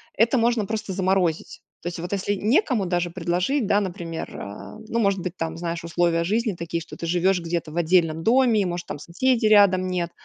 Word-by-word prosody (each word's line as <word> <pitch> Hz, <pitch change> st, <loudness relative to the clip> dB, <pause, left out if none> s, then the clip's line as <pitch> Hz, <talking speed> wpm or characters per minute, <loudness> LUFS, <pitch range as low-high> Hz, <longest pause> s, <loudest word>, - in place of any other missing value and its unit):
Это 230 Hz, +4 st, +3 dB
можно 235 Hz, -2 st, +2 dB
просто 215 Hz, -1 st, -4 dB
заморозить. 185 Hz, -3 st, 0 dB, 0.2 s
То -, -, -6 dB
есть 175 Hz, -1 st, -5 dB
вот 175 Hz, +2 st, -6 dB
если 200 Hz, +1 st, -1 dB
некому 235 Hz, -, +1 dB
даже 175 Hz, -1 st, -1 dB
предложить, 180 Hz, -, -1 dB
да, 205 Hz, +1 st, +3 dB
например, 170 Hz, -4 st, -5 dB
э, 100 Hz, -, -8 dB
ну 230 Hz, -, -1 dB
может 200 Hz, -3 st, +2 dB
быть, 180 Hz, 0 st, -5 dB
там, 165 Hz, -2 st, -4 dB
знаешь, 170 Hz, -1 st, -4 dB
условия 170 Hz, 0 st, +1 dB
жизни 215 Hz, +4 st, 0 dB
такие, 170 Hz, -1 st, -4 dB
что 165 Hz, -, -10 dB
ты -, -, -6 dB
живешь 180 Hz, +2 st, +2 dB
где-то 165 Hz, -2 st, -3 dB
в 160 Hz, -, -7 dB
отдельном 165 Hz, -2 st, +2 dB
доме, 235 Hz, -1 st, +4 dB
и -, -, 0 dB
может 175 Hz, -1 st, -3 dB
там -, -, -6 dB
соседей 225 Hz, -, +1 dB
рядом 195 Hz, -3 st, +5 dB
нет. 175 Hz, -2 st, -2 dB
180 Hz, 205 wpm, -24 LUFS, 170-210 Hz, 0.2 s, рядом